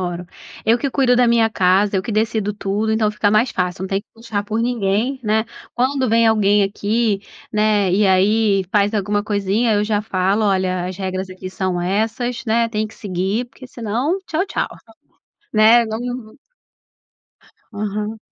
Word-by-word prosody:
Moro. 180 -1 -4 0.4
Eu 230 +2 +3
que 280 - -1
cuido 260 -2 +3
da 245 -1 +4
minha 230 -1 +3
casa, 195 +1 +2
eu 190 - +2
que 210 - -5
decido 215 -1 0
tudo. 205 +2 -2
Então 220 -1 +2
fica 210 -1 +1
mais 215 +4 +3
fácil, 180 0 -2
não 190 - -3
tem 195 +1 0
que 210 - -31
puxar 225 -3 -4
por 215 +2 -3
ninguém, 235 +3 0
né? 220 0 +1 0.3
Quando 260 0 +1
vem 230 +1 +4
alguém 210 -2 +3
aqui, 205 +1 0 0.3
né, 210 -3 +2
e 205 +2 +3
aí 195 +1 +3
faz 205 +1 +2
alguma 205 0 0
coisinha, 210 +2 0
eu 205 0 +1
já 210 -1 0
falo: 200 +1 0
"Olha, 185 -2 0
as 185 0 -6
regras 190 -1 -3
aqui 185 0 -8
são 185 -1 -2
essas, 225 +7 -1
né, 230 +1 +2
tem 215 -1 -1
que 215 - -14
seguir, 195 +4 -2
porque 260 - -13
senão 245 - -2
tchau, 345 +5 -1
tchau, 360 - -2 0.9
né?" 225 +2 +6
Não, 220 +1 -4
num 245 -3 -6 1.4
Aham. 210 +1 -4
210 Hz, 175 wpm, -19 LUFS, 195-230 Hz, 1.4 s, né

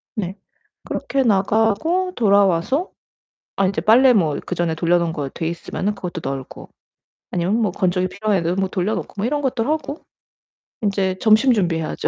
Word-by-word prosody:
네. 190 -3 -3 0.5
그렇게 270 -1 -1
나가고 225 - +1
돌아와서 200 - +2 0.6
아 195 - +2
인제 185 -4 -1
빨래 250 +6 +6
뭐 165 -9 +2
그전에 175 -2 -1
돌려 175 +1 +2
놓은 170 -1 -1
거 145 -4 -4
돼 160 - -4
있으면은 180 +4 -3
그것도 175 -3 -6
널고 135 -1 -6 0.6
아니면 180 +4 0
뭐 210 -4 +1
건조기 185 -1 0
필요한 205 +1 -1
애들은 170 +1 -1
뭐 190 0 -1
돌려 190 +3 -1
놓고 - - -6
뭐 200 - -1
이런 290 +4 0
것도 255 -4 0
하고 310 -1 -3 0.8
인제 195 -2 0
점심 225 +4 +5
준비해야죠. 170 -6 -1
195 Hz, 345 characters per minute, -20 LUFS, 175-225 Hz, 0.8 s, 빨래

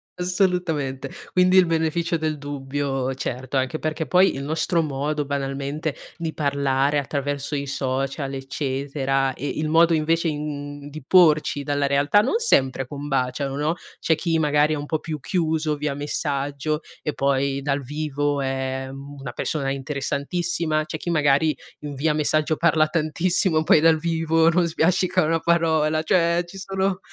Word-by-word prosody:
Assolutamente. 180 -7 -1 0.2
Quindi 185 +1 +4
il 185 - +7
beneficio 165 +1 0
del 155 -1 -2
dubbio, 135 -2 -3
certo, 130 +1 -3
anche 130 +4 -1
perché 155 0 -2
poi 180 +5 +4
il 135 - -5
nostro 160 +3 0
modo, 145 +1 -2
banalmente, 140 +2 -3 0.2
di 165 -2 -4
parlare 140 -1 +1
attraverso 140 +1 -3
i 140 0 -2
social, 135 +1 -2
eccetera, 135 0 -1
e 145 - -5
il 155 +1 -2
modo, 165 +1 +5
invece, 165 +2 +1
i 150 -2 -1
mhmm, 145 -1 -6
di 155 -1 -9
porci 155 -4 +4
dalla 145 0 0
realtà 140 +8 +3
non 340 - +1
sempre 135 - +2
combaciano, 135 -1 -2
no? 150 +4 0 0.2
C'è 160 - +2
chi 165 +1 0
magari 150 0 +3
è - - -4
un 145 - -5
po' 155 0 -1
più 155 -3 -5
chiuso 155 0 0
via 145 -1 -2
messaggio, 145 +1 -2 0.2
e 150 - -2
poi 140 0 0
dal 140 0 0
vivo 145 +1 -2
è, 135 0 -2
mhmm, 140 +1 -9
una 125 -3 -5
persona 135 +2 -2
interessantissima, 155 +3 -1
c'è 155 0 -5
chi 175 - -5
magari 150 -1 +2 0.2
i 145 -1 -6
via 150 +3 +1
messaggio 155 +1 +1
parla 160 -1 +3
tantissimo, 165 +1 +1
poi 155 - +5
dal 160 0 +5
vivo 165 0 +1
non 170 0 +2
sbiascica 175 +2 +2
una 165 +1 +1
parola, 160 -2 +2
cioè 170 +1 +2
ci 195 +3 -10
sono 195 0 -1
150 Hz, 155 wpm, -23 LUFS, 140-165 Hz, 0.2 s, il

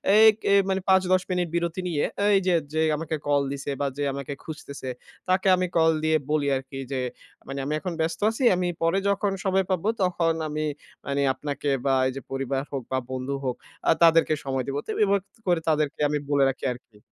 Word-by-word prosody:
এই 220 +1 +8 0.2
এ - - +6 0.2
মানে 190 0 0
৫-১০ 185 -1 +4
মিনিট 180 -1 0
বিরতি 170 +1 -1
নিয়ে 155 -5 0 0.3
এই 195 - +6
যে, 180 - +4 0.2
যে, 160 - +1 0.2
আমাকে 160 0 -3
কল 145 -1 +3
দিছে 140 0 -4
বা - - +1
যে, 145 - -1
আমাকে 140 +1 -5
খুঁজতেছে, 140 -4 -7 0.4
তাকে 190 +1 +3
আমি 185 0 0
কল 160 0 +5
দিয়ে 155 0 +3
বলি 150 -2 +1
আরকি 135 +1 -8
যে, 135 - -1 0.5
মানে, 135 +1 -4
"আমি 150 - -1
এখন 180 +1 -4
ব্যস্ত 165 +1 -1
আছি, 230 - -4
আমি 180 0 0
পরে 165 +4 +2
যখন 200 0 +1
সময় 190 0 +2
পাব, 185 -3 0 0.2
তখন 170 -2 +1
আমি 155 0 -2 0.4
মানে 140 0 -1
আপনাকে" 145 +2 -4 0.2
বা 135 - +3
এই - - -1
যে, 135 - -5
পরিবার 135 0 -1
হোক 135 -3 -3
বা 130 - +1
বন্ধু 130 +2 -3
হোক, 125 - -1 0.3
আ - - +8
তাদেরকে 165 -1 +5
সময় 135 -1 -1
দিব। 140 - -3
তো - - -17
এভাবে 200 -1 +2
তো - - -27
করে 175 -2 +2
তাদেরকে 150 -2 0
আমি 150 - +1
বলে 140 -1 +4
রাখি 135 - -5
আরকি। 120 -3 -17
155 Hz, 205 wpm, -25 LUFS, 140-180 Hz, 0.5 s, এই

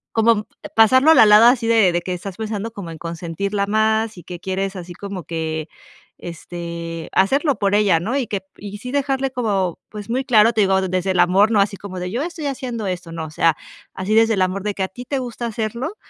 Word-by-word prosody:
Como 225 -1 +3 0.3
pasarlo 260 +7 +6
a - - +8
la 220 - +7
lada 215 +3 +8
así 245 -2 0
de 225 -6 +4
de 175 - 0
que 180 +1 -3
estás 185 +1 -7
pensando 220 0 -4
como 195 -6 -8
en 165 - -9
consentirla 170 +5 -3
más 220 +1 +1
y 175 - -12
que 175 -2 -8
quieres 190 +1 -3
así 175 -1 -8
como 195 -3 -7
que, 160 -1 -4 0.5
este, 170 -1 -7
hacerlo 275 - +2
por 200 0 +1
ella, 200 -6 +3
¿no?, 220 +10 -2
y 255 - -1
que 200 -2 -4
y 205 0 -8
sí 250 +4 -7
dejarle 270 -1 0
como, 200 -8 -1
pues, 210 0 -9
muy 260 +3 0
claro. 230 -3 +5
Te 220 -2 +2
digo 190 0 +3
desde 185 +1 0
el 180 - +2
amor, 190 +5 +4
no 210 - +4
así 200 0 +1
como 185 -2 -8
de: 180 0 -4
"Yo 240 +7 -2
estoy 325 -2 -5
haciendo 250 -5 -4
esto", 180 -2 -5
no, 165 -1 -5
o - - -10
sea, 165 +1 +2 0.4
así 190 +3 -2
desde 225 0 +4
el 190 - +1
amor 185 +1 -1
de 210 -1 -2
que 195 - -3
a 190 - -1
ti 245 +6 -10
te 275 +2 -2
gusta 240 -1 -5
hacerlo 235 - -4
205 Hz, 230 wpm, -20 LUFS, 180-230 Hz, 0.5 s, a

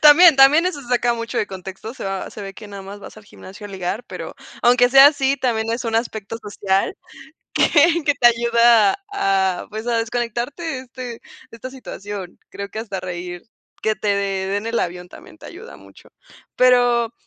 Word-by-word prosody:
También, 310 +1 +8
también, 285 +6 +6
eso 365 -6 -3
se 240 - -15
saca 245 -1 +1
mucho 230 +1 -4
de - - 0
contexto, 190 +4 -9
se 260 - -8
va 195 -1 -4
se 210 - -9
ve 195 0 -8
que 215 - -11
nada 200 -1 -9
más 200 +1 -10
vas - - -12
al 215 - -14
gimnasio 205 +1 -12
a - - -12
ligar, 190 +4 -4
pero, - - -8 0.3
aunque 245 +1 +5
sea 270 +2 +9
así, 275 -2 +2
también 225 -4 -1
es 235 +2 -3
un 225 -1 -2
aspecto 225 -2 -3
social, 195 -1 -1 0.6
que 335 +2 +4
que 290 - +2
te 240 - +5
ayuda 235 -2 +4 0.2
a, 190 - 0
pues, 220 +2 -6
a 235 -1 +1
desconectarte, 240 +6 -3
de, 320 -5 -3
este 255 0 -11
de 240 -2 -7 0.3
esta 230 +3 -8
situación. 205 -7 -8
Creo 200 0 -7
que 215 - -8
hasta 200 -4 -5
reír, 175 -1 -6 0.4
que 220 - +1
te 210 - -4
de 200 -1 -1
den 205 +2 -2
el 230 0 -1
avión, 180 0 -4
también 315 - -15
te - - -12
ayuda 430 +7 -11
mucho, - - -18 0.5
pero, 245 -2 +3
230 Hz, 200 wpm, -20 LUFS, 200-255 Hz, 0.6 s, sea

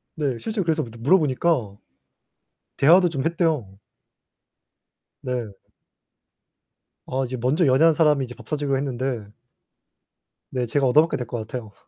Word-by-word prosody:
네, 140 -6 -2
실제로 220 -3 -3
그래서 160 -2 0
물어보니까 130 - +1 1.0
대화도 175 +5 +5
좀 140 -3 -3
했대요. 160 - -1 1.4
네. 120 -5 -4 1.5
아 130 +1 -2
이제 130 +1 -5
먼저 135 +9 +1
연애한 150 +5 +5
사람이 150 -3 +3
이제 125 - -10
밥 120 -3 -15
사주기로 145 -2 -1
했는데. 130 -5 -4 1.2
네, 125 -2 -1
제가 135 +4 0
얻어먹게 155 +6 +3
될 125 - -4
것 120 - -4
같아요. 115 -4 -7
135 Hz, 270 characters per minute, -23 LUFS, 125-155 Hz, 1.5 s, 대화도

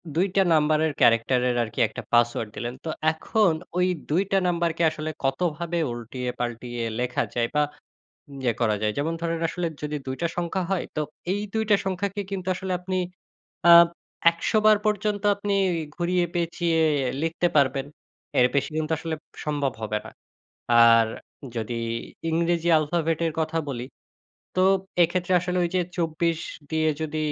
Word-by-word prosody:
২ 185 +4 +3
টা 195 - +5
নাম্বারের 155 0 +3
character 115 +2 +4
এর 120 - 0
আর 110 - -5
কি - - -6
একটা - - -7
পাসওয়ার্ড 120 -2 +2
দিলেন। 120 +1 -4
তো - - -2 0.2
এখন 190 +4 +2 0.3
ওই 180 0 +3 0.2
২ 170 +6 +3
টা 195 - +4
নাম্বারকে 170 -1 0
আসলে 155 0 -5
কতভাবে 170 +4 -1
উল্টিয়ে-পাল্টিয়ে 120 0 -4 0.2
লেখা 125 - 0
যায় 120 -1 +1
বা 150 - +4 0.8
ইয়ে 120 -3 +1
করা 110 -2 +3
যায়। 105 0 +1
যেমন 160 +3 0
ধরেন 165 -1 -1
আসলে 175 0 -2
যদি 150 0 -3
২ 130 - -2
টা 170 - +2
সংখ্যা 175 +2 -1
হয় 190 - 0
তো 155 - 0 0.3
এই 205 +1 -1
২ 220 0 +1
টা 205 - +7
সংখ্যাকে 195 +2 -2
কিন্তু 190 -1 -4
আসলে 190 0 -4
আপনি 185 +1 -4 0.8
আ - - +11 0.6
১০০বার 215 +4 +3
পর্যন্ত 210 0 0
আপনি 205 0 -1 0.4
ঘুরিয়ে 175 0 +1
পেঁচিয়ে 170 -1 0 0.4
লিখতে 165 +2 0
পারবেন। 135 0 +2 0.5
এর 125 - +7
বেশি 140 - +1
কিন্তু 155 0 -1
আসলে 165 -1 -3 0.3
সম্ভব 145 -3 -1
হবে 105 0 -1
না। - - -9 0.7
আর 115 -1 +7 0.5
যদি 115 +1 -3 0.5
ইংরেজি 170 +1 +1
আলফাবেটের 165 +1 0
কথা 160 +1 -1
বলি 125 -2 -4 0.7
তো 185 - +4 0.4
এক্ষেত্রে 180 +2 +1
আসলে 180 0 -2
ওই 170 - 0
যে - - +3 0.2
২৪ 165 0 0 0.3
দিয়ে 160 0 +1
যদি 155 0 -3
160 Hz, 155 wpm, -25 LUFS, 130-180 Hz, 0.8 s, আ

